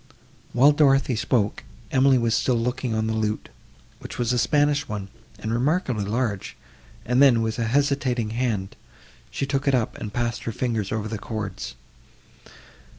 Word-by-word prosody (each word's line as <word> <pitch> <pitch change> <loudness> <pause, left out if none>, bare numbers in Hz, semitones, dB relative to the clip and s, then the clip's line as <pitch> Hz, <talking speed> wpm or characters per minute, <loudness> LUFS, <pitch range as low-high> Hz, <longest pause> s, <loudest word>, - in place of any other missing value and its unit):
While 135 +4 +6
Dorothée 135 -3 +3
spoke, 110 -2 0 0.3
Emily 135 0 +4
was 115 -2 +1
still 125 - +2
looking 125 0 -1
on 110 0 0
the 110 - -1
lute, 110 -1 -2 0.5
which - - -8
was 120 0 0
a 125 - +1
Spanish 145 +2 +2
one, 100 -2 -5 0.3
and 110 +2 -3
remarkably 125 - 0
large; 110 -2 -2 0.5
and 125 +3 +2
then, 120 -5 +6
with 110 +1 -2
a 115 - +1
hesitating 130 -3 +1
hand, 110 -5 -2 0.5
she 140 - -2
took 135 0 -2
it 135 - +4
up, 120 -4 -1
and 105 - -5
passed 120 +1 -2
her 115 - -1
fingers 115 -4 -2
over 110 -1 -2
the 110 -1 -4
chords. 110 -2 -5
120 Hz, 160 wpm, -24 LUFS, 110-135 Hz, 0.5 s, While